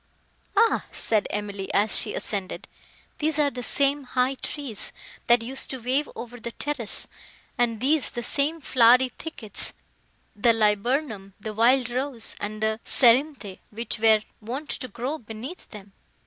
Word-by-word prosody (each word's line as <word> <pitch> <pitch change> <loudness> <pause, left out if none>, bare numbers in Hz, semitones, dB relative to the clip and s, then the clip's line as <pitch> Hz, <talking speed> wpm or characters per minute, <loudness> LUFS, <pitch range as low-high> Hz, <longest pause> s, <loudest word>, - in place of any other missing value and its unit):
"Ah!" 460 - +4
said 215 -2 +1
Emily, 205 -2 -4
as 205 +1 +5
she - - +4
ascended, 195 -3 -4 0.5
"these 310 0 0
are 290 -2 +3
the 250 - -6
same 280 +4 +2
high 255 +1 +1
trees, 270 -4 -5 0.4
that 240 -1 +5
used 265 +3 -2
to 265 - -4
wave 260 +5 0
over 245 +1 -8
the 230 +1 -6
terrace, 285 -8 -3 0.5
and 235 -3 +1
these 280 +4 +2
the 240 - -5
same 295 +6 0
flowery 255 0 +5
thickets—the 230 -4 -3
liburnum, 215 0 0
the 215 +1 -5
wild 245 +3 +3
rose, 255 -2 -3
and 215 +1 -4
the 220 0 +1
cerinthe—which 235 -4 +1
were 220 -1 +5 0.2
wont 260 +8 -5
to 255 - -4
grow 255 +7 -4
beneath 230 +9 -9
them! 200 -2 -12
240 Hz, 140 wpm, -25 LUFS, 215-275 Hz, 0.5 s, as